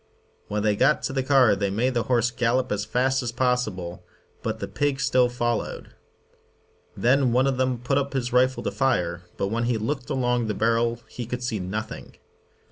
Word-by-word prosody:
When 105 0 -2
they 105 -1 +2
got 150 +8 +3
to - - -2
the 135 - +1
car 130 -5 +4
they 100 0 -1
made 120 +6 0
the 120 - +1
horse 120 -1 +2
gallop 125 +1 0
as 105 0 -1
fast 130 +4 +1
as 120 -2 -3
possible, 110 -9 -1 0.4
but - - -2
the 100 - -5
pig 140 +6 -1
still 130 -3 +3
followed. 120 -1 -3 1.0
Then 130 +1 +3
one 125 +2 +3
of 135 -2 0
them 130 -1 +1
put 125 +4 0
up 140 0 -3
his 125 -2 -2
rifle 130 +1 +3
to - - -1
fire, 90 -10 0 0.2
but 100 - -1
when 115 +2 -1
he 120 -1 +1
looked 125 +4 -3
along 125 -3 0
the 105 - -2
barrel 115 +1 +1
he 120 -3 -7
could 125 +1 -4
see 115 -4 -2
nothing. 105 +4 -5
120 Hz, 195 wpm, -25 LUFS, 110-130 Hz, 1.0 s, car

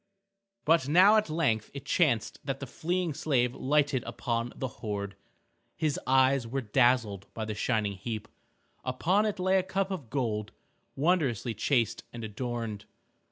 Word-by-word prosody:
But 160 -3 +4
now 185 +7 +7
at 215 -5 +1
length 140 -10 0
it 140 - -7
chanced 135 - +1
that 135 -1 -3
the 140 - -5
fleeing 170 +5 -2
slave 125 -4 +1
lighted 140 -2 +1
upon 115 +1 -2
the 130 - -3
hoard. 100 -2 -4 0.6
His 155 -3 0
eyes 130 -1 +4
were 135 +4 -2
dazzled 115 -4 +2
by 110 - -3
the 110 - -3
shining 105 -1 0
heap. 110 +2 -5 0.6
Upon 180 +12 +1
it 210 -1 -2
lay 185 +1 +3
a - - +2
cup 190 +1 -2
of 155 -12 -5
gold, 110 -6 -2 0.4
wondrously 140 - +1
chased 115 +1 0
and 120 -1 -7
adorned. 110 -1 -4
130 Hz, 150 wpm, -29 LUFS, 110-155 Hz, 0.6 s, now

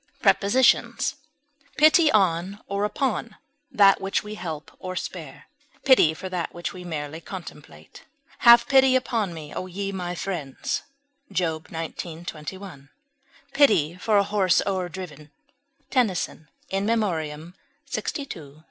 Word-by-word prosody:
Prepositions: 235 +2 +3 0.6
Pity 310 +1 +6
on 190 0 +1
or 200 +1 -1
upon 230 -1 -2 0.3
that 195 -1 +5
which 195 0 -1
we 210 0 -7
help 160 -7 -6
or 185 0 -6
spare; 155 -6 -7 0.4
pity 210 - +6
for 190 - -6
that 180 -2 -3
which 175 -2 -4
we 180 - -9
merely 155 -2 -5
contemplate; 185 +1 -11 0.4
"have 235 0 +8
pity 265 -1 +5
upon 230 -6 0
me, 155 -3 -9
O 185 - -4
ye 195 +2 -4
my 180 -2 -4
friends," 165 -8 -3 0.5
Job 165 -4 -1
xix, 165 +1 -6
21; 155 -2 -9 0.6
"pity 195 - +4
for 210 +3 +1
a 200 - +5
horse 195 -3 +2
o'erdriven," 180 -6 -4 0.6
TENNYSON 185 - 0 0.2
In 195 +1 0
Memoriam 170 -7 -1 0.3
lxii, - - -3
st. 275 - -7
1. 150 -3 -13
185 Hz, 130 wpm, -25 LUFS, 160-210 Hz, 0.6 s, have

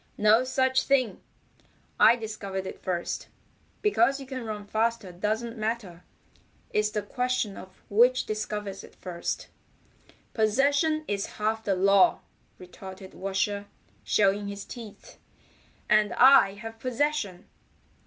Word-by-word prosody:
"No 215 +3 +5
such 260 0 +2
thing. 255 -8 +1 0.8
I 230 - +7
discovered 200 -4 -5
it - - -8
first. 175 -2 -3 0.6
Because 275 - +3
you 270 - -8
can 260 -1 -6
run 210 -1 -5
faster 220 -2 -1
doesn't 220 +6 -3
matter. 215 -6 -3 0.7
It's 210 0 +1
the 210 -1 -3
question 250 -2 -1
of 185 0 -13
which 245 +5 +4
discovers 210 -2 -4
it - - -15
first." 175 -2 -5 0.8
"Possession 285 +8 +2
is 200 -1 -3
half 220 +1 -1
the 195 -3 +1
law," 195 +1 +4 0.4
retorted 190 +1 -11
Washer, 200 +1 -2 0.4
showing 200 0 +2
his 200 0 -6
teeth. 225 -4 -11 0.7
"And 215 -1 +3
I 250 -6 +7
have 225 +2 -9
possession." 255 -6 -1
215 Hz, 120 wpm, -27 LUFS, 195-245 Hz, 0.8 s, I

